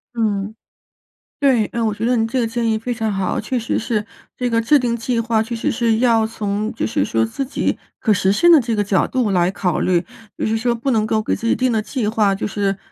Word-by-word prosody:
嗯， 210 Hz, -2 st, -1 dB, 0.8 s
对， 260 Hz, -6 st, +3 dB
呃， 235 Hz, -, -3 dB
我 215 Hz, -2 st, +1 dB
觉 215 Hz, +2 st, -3 dB
得 250 Hz, -, +2 dB
您 225 Hz, -1 st, +1 dB
这 255 Hz, +3 st, -1 dB
个 235 Hz, -, +1 dB
建 230 Hz, 0 st, -1 dB
议 220 Hz, -, +1 dB
非 240 Hz, +3 st, -3 dB
常 220 Hz, -2 st, -2 dB
好， 195 Hz, -1 st, -1 dB
啊， -, -, -1 dB
确 250 Hz, +4 st, -2 dB
实 230 Hz, -, -1 dB
是 215 Hz, -2 st, -2 dB, 0.3 s
这 250 Hz, -1 st, -1 dB
个 230 Hz, 0 st, +2 dB
制 290 Hz, +6 st, +4 dB
定 240 Hz, -2 st, 0 dB
计 235 Hz, +1 st, -1 dB
划， 230 Hz, -1 st, +1 dB
确 235 Hz, +1 st, -5 dB
实 285 Hz, +6 st, -1 dB
是 230 Hz, -2 st, +1 dB
要 230 Hz, -2 st, +3 dB
从， 215 Hz, +1 st, -3 dB
就 -, -, -2 dB
是 155 Hz, -, 0 dB
说， 115 Hz, +2 st, +1 dB
自 190 Hz, -, -4 dB
己 265 Hz, -, -1 dB, 0.2 s
可 215 Hz, -, +2 dB
实 190 Hz, 0 st, +2 dB
现 345 Hz, +11 st, +4 dB
的 325 Hz, -, +8 dB
这 230 Hz, -1 st, -2 dB
个 205 Hz, -, +1 dB
角 195 Hz, -1 st, +1 dB
度 250 Hz, -6 st, 0 dB
来 180 Hz, -1 st, +2 dB
考 180 Hz, -3 st, -1 dB
虑。 180 Hz, -1 st, +1 dB, 0.3 s
就 -, -, -2 dB
是 220 Hz, +1 st, 0 dB
说 235 Hz, +1 st, 0 dB
不 245 Hz, +4 st, -2 dB
能 220 Hz, -3 st, +2 dB
够 215 Hz, 0 st, +1 dB
给 -, -, -1 dB
自 230 Hz, -, -4 dB
己 -, -, +3 dB
定 255 Hz, -1 st, +1 dB
的 220 Hz, -, +1 dB
计 225 Hz, 0 st, -3 dB
划， 210 Hz, -2 st, +2 dB
就 200 Hz, -, -4 dB
是 200 Hz, -1 st, -1 dB
225 Hz, 280 characters per minute, -19 LUFS, 210-235 Hz, 0.8 s, 的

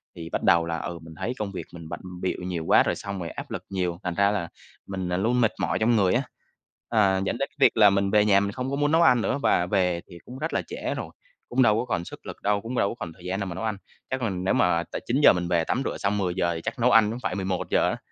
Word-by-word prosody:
thì 85 Hz, -1 st, -7 dB
bắt -, -, -3 dB
đầu 85 Hz, -3 st, +4 dB
là, 85 Hz, 0 st, -2 dB
ừ, 85 Hz, 0 st, -5 dB
mình 80 Hz, 0 st, -11 dB
thấy 125 Hz, -, -2 dB
công 100 Hz, -2 st, -3 dB
việc 95 Hz, -, -6 dB
mình 85 Hz, -2 st, -9 dB
bận -, -, -5 dB, 0.2 s
bịu 95 Hz, -, -1 dB
nhiều 90 Hz, -3 st, -4 dB
quá -, -, +5 dB
rồi -, -, 0 dB
xong 100 Hz, -2 st, -6 dB
rồi 85 Hz, -2 st, -4 dB
áp -, -, -8 dB
lực -, -, -4 dB
nhiều, 90 Hz, -3 st, -2 dB
thành 90 Hz, -1 st, -2 dB
ra 100 Hz, +2 st, +3 dB
là 85 Hz, -5 st, -2 dB, 0.4 s
mình, 95 Hz, -2 st, -4 dB
ờ, 90 Hz, -, 0 dB
luôn 120 Hz, +5 st, +1 dB
mệt 110 Hz, -, +3 dB
mỏi -, -, 0 dB
trong 115 Hz, +2 st, +3 dB
người 95 Hz, -2 st, +3 dB
á. 130 Hz, +3 st, +2 dB, 0.7 s
Ờ, 95 Hz, -3 st, +3 dB
dẫn 120 Hz, -, -1 dB
đến 140 Hz, -, -2 dB
cái 150 Hz, -, -36 dB
việc 130 Hz, -, +4 dB
là 105 Hz, -2 st, +8 dB
mình 100 Hz, 0 st, +1 dB
về 105 Hz, -1 st, +4 dB
nhà 100 Hz, -1 st, +5 dB
mình 100 Hz, 0 st, -1 dB
không 125 Hz, +3 st, -4 dB
có -, -, 0 dB
muốn 145 Hz, +1 st, +1 dB
nấu 165 Hz, +1 st, +4 dB
ăn 125 Hz, -8 st, +5 dB
nữa 135 Hz, +5 st, -1 dB
và 85 Hz, -, +3 dB
về 90 Hz, -3 st, +1 dB
thì 85 Hz, -, -11 dB
cũng 125 Hz, -, -9 dB
rất 160 Hz, -, -3 dB
là -, -, +1 dB
trễ -, -, -4 dB
rồi, -, -, -5 dB, 0.4 s
cũng 130 Hz, +2 st, +2 dB
đâu 110 Hz, -3 st, +5 dB
có -, -, -2 dB
còn 85 Hz, -8 st, -2 dB
sức -, -, -11 dB
lực -, -, -8 dB
đâu, 100 Hz, 0 st, +1 dB
cũng 120 Hz, +3 st, -5 dB
đâu 100 Hz, -, +2 dB
có -, -, -5 dB
còn 85 Hz, -5 st, -6 dB
thời 90 Hz, 0 st, -16 dB
gian 95 Hz, +2 st, -2 dB
nào 100 Hz, -, -3 dB
mà 85 Hz, -, -5 dB
nấu 95 Hz, -, -5 dB
ăn. 110 Hz, -3 st, -1 dB, 0.3 s
Chắc 130 Hz, -1 st, -2 dB
mình 95 Hz, -5 st, -2 dB
nếu 95 Hz, -, +2 dB
mà 85 Hz, -1 st, +2 dB
tại -, -, -4 dB
9:00 135 Hz, -1 st, +6 dB
mình 90 Hz, -1 st, -2 dB
về 85 Hz, -2 st, +2 dB
tắm 130 Hz, -, -1 dB
rửa -, -, -2 dB
xong 100 Hz, +1 st, 0 dB
10:00, 90 Hz, -3 st, 0 dB
thì 80 Hz, -, -5 dB
chắc -, -, -5 dB
nấu 125 Hz, +2 st, +4 dB
ăn 110 Hz, -1 st, +5 dB
cũng 120 Hz, -, -5 dB
phải -, -, -1 dB
11:00 95 Hz, -2 st, 0 dB
á, -, -, -2 dB
100 Hz, 305 wpm, -25 LUFS, 90-115 Hz, 0.7 s, là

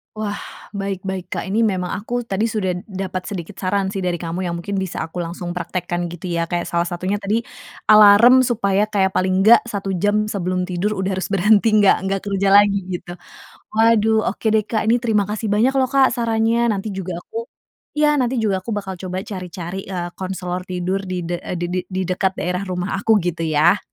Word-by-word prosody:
Wah, 210 Hz, -1 st, -3 dB, 0.4 s
baik 195 Hz, -1 st, -3 dB
baik 190 Hz, -2 st, -4 dB
Kak, -, -, -2 dB
ini 225 Hz, +4 st, +2 dB
memang 185 Hz, -4 st, -1 dB
aku 240 Hz, +4 st, -3 dB
tadi 215 Hz, -2 st, -1 dB
sudah 200 Hz, -5 st, -1 dB
dapat 190 Hz, -2 st, -5 dB
sedikit 190 Hz, -1 st, -6 dB
saran 195 Hz, 0 st, 0 dB
sih 195 Hz, -, -5 dB
dari 180 Hz, -2 st, -2 dB
kamu 175 Hz, +2 st, -3 dB
yang 175 Hz, -, -2 dB
mungkin 185 Hz, +4 st, -4 dB
bisa 190 Hz, -2 st, -3 dB
aku 160 Hz, +2 st, -6 dB
langsung 175 Hz, +1 st, -5 dB
praktekkan 175 Hz, 0 st, -3 dB
gitu 175 Hz, +1 st, -6 dB
ya. 170 Hz, -1 st, 0 dB
Kayak 175 Hz, +1 st, -3 dB
salah 170 Hz, 0 st, 0 dB
satunya 185 Hz, +3 st, -2 dB
tadi 205 Hz, +3 st, -1 dB, 0.5 s
alarm 215 Hz, +5 st, +8 dB
supaya 210 Hz, -4 st, +1 dB
kayak 200 Hz, -3 st, +1 dB
paling 185 Hz, 0 st, +1 dB
enggak, 225 Hz, +4 st, +6 dB
1 200 Hz, -4 st, -4 dB
jam 210 Hz, +3 st, +1 dB
sebelum 185 Hz, -2 st, -2 dB
tidur 185 Hz, +4 st, -1 dB
udah 190 Hz, -1 st, -2 dB
harus 190 Hz, -, -2 dB
berhenti 210 Hz, +3 st, +4 dB
nggak 200 Hz, -, +5 dB
nggak 195 Hz, 0 st, -1 dB
kerja 195 Hz, 0 st, 0 dB
lagi 205 Hz, 0 st, +6 dB, 0.2 s
gitu. 175 Hz, 0 st, -6 dB, 0.5 s
Waduh. 220 Hz, 0 st, +3 dB
Oke 205 Hz, -, -3 dB
deh 215 Hz, -1 st, +2 dB
Kak, 220 Hz, -1 st, -1 dB
ini 240 Hz, -, +4 dB
terima 225 Hz, -4 st, +1 dB
kasih 215 Hz, +1 st, -3 dB
banyak 215 Hz, +5 st, +3 dB
loh 260 Hz, -, +3 dB
Kak, 270 Hz, -1 st, +5 dB
sarannya, 230 Hz, -1 st, +1 dB, 0.2 s
nanti 200 Hz, +2 st, -4 dB
juga 190 Hz, -2 st, -5 dB
aku 455 Hz, -, -6 dB, 0.5 s
iya, 300 Hz, 0 st, +4 dB
nanti 250 Hz, 0 st, 0 dB
juga 200 Hz, -3 st, +1 dB
aku 230 Hz, -, -6 dB
bakal 190 Hz, -2 st, -5 dB
coba 185 Hz, 0 st, -4 dB
cari-cari, 180 Hz, -1 st, -6 dB
eee, 175 Hz, -2 st, -4 dB
konselor 185 Hz, -1 st, -4 dB
tidur 185 Hz, +2 st, -1 dB
di 180 Hz, -1 st, -2 dB
de 175 Hz, -, -1 dB
eee, -, -, -6 dB
di 175 Hz, -, -1 dB
de 180 Hz, -, -1 dB
di 185 Hz, -1 st, -4 dB
dekat 190 Hz, +1 st, +1 dB
daerah 180 Hz, +1 st, -1 dB
rumah 180 Hz, +1 st, -2 dB
aku 220 Hz, +3 st, +2 dB
gitu 175 Hz, -1 st, -2 dB
ya. 160 Hz, +5 st, +4 dB
195 Hz, 200 wpm, -20 LUFS, 180-215 Hz, 0.5 s, alarm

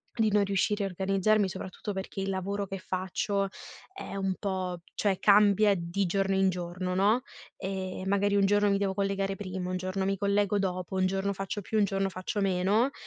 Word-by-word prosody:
di 225 Hz, -2 st, +3 dB
non 205 Hz, 0 st, +4 dB
riuscire 200 Hz, +1 st, +1 dB
a -, -, 0 dB
organizzarmi, 195 Hz, +2 st, +1 dB
soprattutto 190 Hz, +3 st, -6 dB
perché 195 Hz, 0 st, -5 dB
il 195 Hz, -, -2 dB
lavoro 195 Hz, +1 st, -2 dB
che 195 Hz, -, -5 dB
faccio 190 Hz, +2 st, -1 dB, 0.4 s
è 390 Hz, -, -8 dB
un 195 Hz, -1 st, -1 dB
po' 185 Hz, -3 st, -3 dB
cioè 195 Hz, -3 st, +1 dB
cambia 205 Hz, 0 st, +5 dB
di 175 Hz, +2 st, -1 dB
giorno 195 Hz, +2 st, +1 dB
in 190 Hz, 0 st, +4 dB
giorno, 180 Hz, +1 st, -4 dB
no, 205 Hz, +6 st, +3 dB, 0.4 s
ehm, 190 Hz, -1 st, -4 dB
magari 200 Hz, +1 st, +2 dB
un 200 Hz, -, +4 dB
giorno 205 Hz, +1 st, +3 dB
mi 200 Hz, -, +3 dB
devo 195 Hz, -1 st, 0 dB
collegare 195 Hz, 0 st, -1 dB
prima, 185 Hz, -2 st, -4 dB
un 185 Hz, -, -1 dB
giorno 185 Hz, +1 st, -2 dB
mi 195 Hz, 0 st, +1 dB
collego 200 Hz, +1 st, +1 dB
dopo, 185 Hz, -1 st, -2 dB
un 185 Hz, 0 st, +3 dB
giorno 195 Hz, +1 st, -1 dB
faccio 195 Hz, +1 st, -4 dB
più, 215 Hz, +3 st, -1 dB
un -, -, +5 dB
giorno 195 Hz, 0 st, 0 dB
faccio 185 Hz, +2 st, -3 dB
meno. 195 Hz, +7 st, +2 dB
195 Hz, 195 wpm, -29 LUFS, 185-200 Hz, 0.4 s, cambia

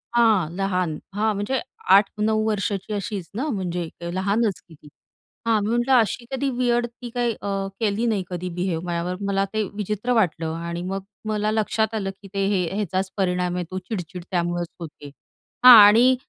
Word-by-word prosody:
हां, 215 Hz, -9 st, +4 dB
लहान 185 Hz, -5 st, -1 dB, 0.2 s
हां 215 Hz, +1 st, +1 dB
म्हणजे 210 Hz, +6 st, -1 dB, 0.4 s
8-9 215 Hz, +2 st, +2 dB
वर्षाची 200 Hz, -1 st, -2 dB
अशीच 200 Hz, -4 st, -4 dB
ना 265 Hz, +7 st, -2 dB
म्हणजे 180 Hz, -, -3 dB, 0.2 s
लहानच 200 Hz, +2 st, 0 dB
की 165 Hz, -, -16 dB
ती. 150 Hz, -, -18 dB, 0.6 s
हां 225 Hz, -2 st, +4 dB
मी 210 Hz, -, -1 dB
म्हटलं 240 Hz, +3 st, +2 dB
अशी 235 Hz, 0 st, +2 dB
कधी 270 Hz, +1 st, -1 dB
विअर्ड 240 Hz, -1 st, +1 dB
ती 240 Hz, +1 st, -10 dB
काही 240 Hz, -1 st, +1 dB, 0.5 s
केली 220 Hz, +1 st, 0 dB
नाही 210 Hz, -5 st, 0 dB
कधी 180 Hz, 0 st, -4 dB
बिहेव 175 Hz, -2 st, -1 dB
माझ्यावर, 175 Hz, +1 st, -2 dB
मला 195 Hz, 0 st, +1 dB
ते 215 Hz, -, +1 dB
विचित्र 210 Hz, +4 st, -2 dB
वाटलं 165 Hz, -7 st, +1 dB
आणि 170 Hz, +1 st, -4 dB
मग 190 Hz, +1 st, -4 dB, 0.2 s
मला 215 Hz, 0 st, 0 dB
लक्षात 220 Hz, 0 st, 0 dB
आलं, 195 Hz, -3 st, -2 dB
की 200 Hz, -, -11 dB
ते 195 Hz, 0 st, 0 dB
हे 195 Hz, -3 st, +1 dB
ह्याचाच 190 Hz, -2 st, -2 dB
परिणाम 180 Hz, -2 st, 0 dB
आहे 180 Hz, -, -1 dB
तो 185 Hz, -, -3 dB
चिडचिड 180 Hz, -3 st, -6 dB
त्यामुळेच 175 Hz, -1 st, -1 dB
होते. 150 Hz, -3 st, -9 dB, 0.6 s
हां 250 Hz, -, +13 dB
आणि 240 Hz, +5 st, +6 dB
200 Hz, 170 wpm, -23 LUFS, 180-220 Hz, 0.6 s, हां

